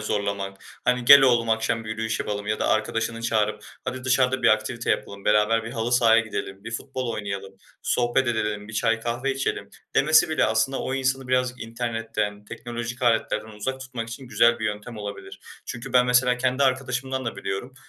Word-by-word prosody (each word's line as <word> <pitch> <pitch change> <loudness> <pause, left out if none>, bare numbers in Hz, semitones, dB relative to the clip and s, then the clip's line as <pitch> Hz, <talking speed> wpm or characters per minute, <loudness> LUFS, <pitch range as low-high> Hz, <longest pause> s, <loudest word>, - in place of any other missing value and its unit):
zorlamak, 100 -2 -3 0.2
hani, 125 -1 +1
"Gel 140 +3 +10
oğlum, 120 -3 +3
akşam 115 0 0
bir 110 - -6
yürüyüş 110 0 -2
yapalım" 100 0 -3
ya 105 0 -1
da - - 0
arkadaşını 115 +1 -1
çağırıp, 105 -2 0 0.2
"Hadi, 130 0 -5
dışarıda 130 0 +2
bir - - +5
aktivite 110 +2 +1
yapalım, 100 0 -3
beraber 105 +2 +3
bir 115 - -6
halı 115 0 -2
sahaya 115 -2 +5
gidelim, 100 -2 -6
bir 115 - -6
futbol 130 0 -4
oynayalım, 100 -2 -5 0.3
sohbet 120 +2 +1
edelim, 105 -2 -2
bir - - -9
çay 115 +1 +1
kahve 120 +4 -1
içelim" 135 0 -3 0.2
demesi 155 +3 +5
bile 155 - +2
aslında 110 +5 +1
o 130 - -2
insanı 135 -1 -1
birazcık 125 0 0
internetten, 115 -3 -3
teknolojik 120 +3 -6
aletlerden 110 -2 +1
uzak 110 +5 -4
tutmak 125 -3 -6
için 125 +3 -8
güzel 120 0 +4
bir 110 - -4
yöntem 105 +2 -4
olabilir. 100 -2 -8 0.3
Çünkü 125 +1 -7
ben, 125 -1 +5
mesela 125 0 +3
kendi 130 +2 0
arkadaşımdan 130 0 0
da 115 -3 -4
biliyorum, 100 +7 -5
115 Hz, 180 wpm, -24 LUFS, 105-125 Hz, 0.3 s, Gel